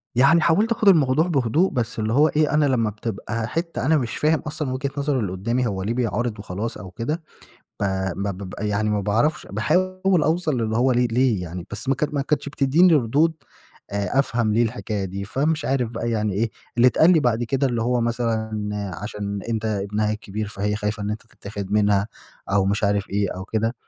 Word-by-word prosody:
يعني 140 +7 +5
حاولت 200 +9 +3
آخُد 220 -2 +1
الموضوع 155 -3 +5
بهدوء 155 +3 +2
بس 120 -2 -2
اللي 110 +1 0
هو 145 +5 +5
إيه، 155 -1 +1
أنا 150 -1 +4
لما 120 -5 +2
بتبقى 110 +1 -4
حِتّة 165 -2 -3
أنا 155 +1 +4
مش 120 -4 -3
فاهم 155 0 +2
أصلًا 150 -3 -4
وجهة 135 +2 -2
نظر 140 -1 0
اللي 100 -6 -2
قُدّامي 115 +7 -1
هو 95 -3 -3
ليه 110 +4 -1
بيعارض 120 -2 -1
وخلاص 100 +4 -4
أو 95 - -9
كده 150 - -3 0.6
ب - - +1 0.3
ب 100 - -3 0.2
ب 95 -2 -7
يعني 105 +1 0
ما 105 -1 +1
باعرفش 110 +10 0
باحاول 185 - +1
أوصَل 155 -4 +1
اللي 110 0 -1
هو 130 +2 +3
ليه 125 0 +3
ليه 120 -5 +2
يعني 90 +1 -6
بس 105 +5 -6
ما 135 - +4
ك 150 +3 -2
ما 140 - +1
كانتش 145 +1 -1
بتدّيني 150 +5 +4
ردود 150 +5 +2 0.6
آآ 100 +4 -1
أفهَم 115 -5 +1
ليه 115 +3 +3
الحكاية 110 -3 -2
دي 95 +1 -5
فمش 150 +9 -1
عارف 125 -3 0
بقى 115 0 -3
يعني 105 -2 0
إيه، 110 +3 0 0.3
اللي 120 +1 +5
اتقال 160 +6 +4
لي 165 - +4
بعد 120 -4 +1
كده، 135 +3 +1
اللي 120 -3 -1
هو 120 +1 +1
مثلًا 115 -2 -1 0.5
عشان 100 -1 -4
أنت 110 -1 -2
ابنها 105 0 -1
الكبير 105 0 -5
فهي 105 0 -2
خايفة 105 0 -3
إن 100 - -2
أنت 105 +1 -5
تتاخد 100 -3 -7
منها 105 -1 +3 0.4
أو 100 -1 +3
مش 100 +2 0
عارف 100 -1 0
إيه 100 -1 0
أو 95 - -6
كده 110 +3 -1
115 Hz, 205 wpm, -23 LUFS, 105-140 Hz, 0.6 s, يعني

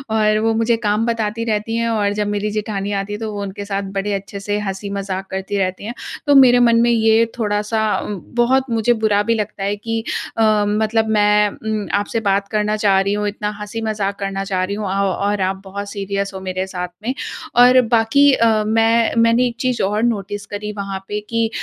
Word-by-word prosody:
और 215 -1 +3
वो 225 +1 +1
मुझे 230 +1 +2
काम 210 +2 +1
बताती 230 -1 -1
रहती 220 0 -1
हैं 230 0 0
और 210 -3 +1
जब 210 0 -1
मेरी 205 0 -1
जेठानी 205 -1 -3
आती 200 0 -2
है, 210 - -5
तो 220 -1 -4
वो 205 - -4
उनके 200 0 -6
साथ 200 0 -2
बड़े 205 +1 -1
अच्छे 200 0 -5
से 205 +1 -2
हँसी-मज़ाक 195 -1 -4
करती 190 +2 -3
रहती 185 0 -2
हैं। 230 - -4 0.3
तो 285 - +5
मेरे 250 -2 +7
मन 235 -1 +4
में 240 - +3
ये 225 0 +4
थोड़ा-सा 210 -1 -1 0.3
उँ 205 - -4 0.2
बहुत 260 +2 +2
मुझे 230 +1 +2
बुरा 215 -3 +1
भी 230 +2 +1
लगता 210 -2 -4
है 200 +1 0
कि 225 +2 -3 0.3
अ, - - +1 0.3
मतलब 220 +1 +1
मैं 210 -1 +4
उम, 215 0 -4
आपसे 205 +2 -2
बात 200 -2 0
करना 210 0 0
चाह 200 -2 +3
रही 200 +1 0
हूँ, 210 0 -1
इतना 210 0 -3
हँसी-मज़ाक 210 -1 -3
करना 195 -1 -3
चाह 190 -2 -1
रही 200 +2 -2
हूँ 210 0 -4
औ - - -2 0.4
और 205 -1 -2
आप 190 +1 -1
बहुत 200 +1 -6
सीरियस 200 -1 -3
हो 190 - -6
मेरे 185 0 -3
साथ 180 -1 -4 0.2
में। 250 +3 -1 0.4
और 250 +1 +7
बाकी 235 +5 +5
अ, 230 - +3 0.2
मैं 225 +1 +2
मैंने 230 +2 +4
एक 235 - -5
चीज़ 250 -1 0
और 210 +3 0
नोटिस 205 -3 -2
करी 210 +1 -5
वहाँ 195 -1 -4
पे 210 - -3
कि 230 -1 +1
210 Hz, 210 wpm, -19 LUFS, 200-225 Hz, 0.4 s, मेरे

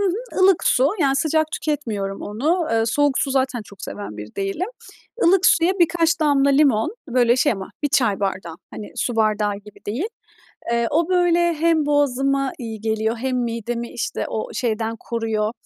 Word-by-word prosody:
Hı 405 - +2
hı, 415 +2 -3
ılık 375 -2 +4
su 260 +3 +4
yani 275 -2 +3
sıcak 315 +1 +1
tüketmiyorum 215 -10 -3
onu. 310 - -1
Iıı, 225 0 +2
soğuk 285 +3 +2
su 275 - 0
zaten 260 -3 0
çok 200 -1 -15
seven 100 +1 -7
bir 105 0 -9
değilim. 195 - -2 0.6
Ilık 375 +2 +5
suya 335 +2 +4
birkaç 335 0 +2
damla 280 -2 +3
limon 275 - +3
böyle 240 -1 +3
şey 280 +1 +3
ama 195 -2 -7
1 290 - +1
çay 220 -7 +1
bardağı 185 -4 -3
hani 210 - -9
su 240 -2 -2
bardağı 210 -2 +1
gibi 205 0 -14
değil. 265 - -2 0.6
Iıı, 235 0 +1
o 330 +3 +1
böyle 345 -2 +3
hem 315 -1 +2
boğazıma 275 -1 +1
iyi 225 -3 -6
geliyor 220 +1 -1
hem 255 +2 -2
midemi 235 +1 -4
işte - - -3
o - - -3
şeyden 225 -1 -1
koruyor, 225 -2 -2
255 Hz, 170 wpm, -21 LUFS, 220-315 Hz, 0.6 s, Ilık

